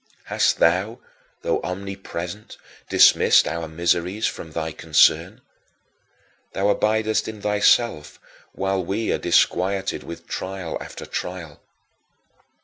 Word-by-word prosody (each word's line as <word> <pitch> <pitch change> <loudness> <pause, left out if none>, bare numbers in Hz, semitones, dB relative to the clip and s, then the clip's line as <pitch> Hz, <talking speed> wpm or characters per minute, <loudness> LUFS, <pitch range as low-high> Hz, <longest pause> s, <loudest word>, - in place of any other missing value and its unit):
Hast - - +1
thou 95 +7 +2 0.5
though - - 0
omnipresent 95 0 -6 0.3
dismissed - - +5
our 85 -1 -3
miseries 85 +5 0
from 80 - -4
thy 80 0 -3
concern? 80 -1 +2 1.1
Thou 100 +1 0
abidest 110 +1 0
in 110 -1 -7
thyself 105 -5 +2 0.3
while 95 -1 -1
we 105 +6 -2
are - - 0
disquieted 95 +1 +1
with 85 - -10
trial 95 -3 -5
after - - -8
trial. 85 -5 -6
95 Hz, 105 wpm, -22 LUFS, 85-105 Hz, 1.1 s, dismissed